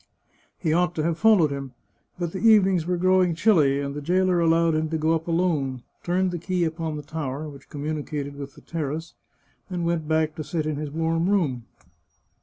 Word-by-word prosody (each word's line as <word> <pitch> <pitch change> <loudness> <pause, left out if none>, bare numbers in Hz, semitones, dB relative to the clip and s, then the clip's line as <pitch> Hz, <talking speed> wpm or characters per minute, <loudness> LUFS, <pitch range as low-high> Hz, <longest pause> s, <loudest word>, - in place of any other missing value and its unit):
He 160 -5 0
ought 175 +1 +1
to 155 - -1
have 165 0 -1
followed 210 -9 +5
him, 135 -2 -5 0.4
but 175 -2 -3
the 190 - -5
evenings 195 -7 +4
were 180 0 0
growing 185 -1 +3
chilly, 160 -7 +3
and 140 0 -3
the 145 - -5
jailer 180 +3 +2
allowed 165 0 +3
him 155 0 0
to 160 - -1
go 160 +1 +2
up 165 0 -2
alone, 155 -8 0 0.2
turned 185 +1 0
the 175 - -4
key 180 +1 -1
upon 160 -1 -2
the 150 - -6
tower, 145 0 -4
which 140 -2 -12
communicated 145 -1 -4
with 140 -1 -8
the - - -15
terrace, 160 0 -4 0.6
and 175 -2 -2
went 170 -2 -1
back 155 0 +1
to 155 - -3
sit 155 +1 -2
in 155 -2 -2
his 150 0 -4
warm 165 +3 0
room. 145 - 0
160 Hz, 200 wpm, -25 LUFS, 150-175 Hz, 0.6 s, followed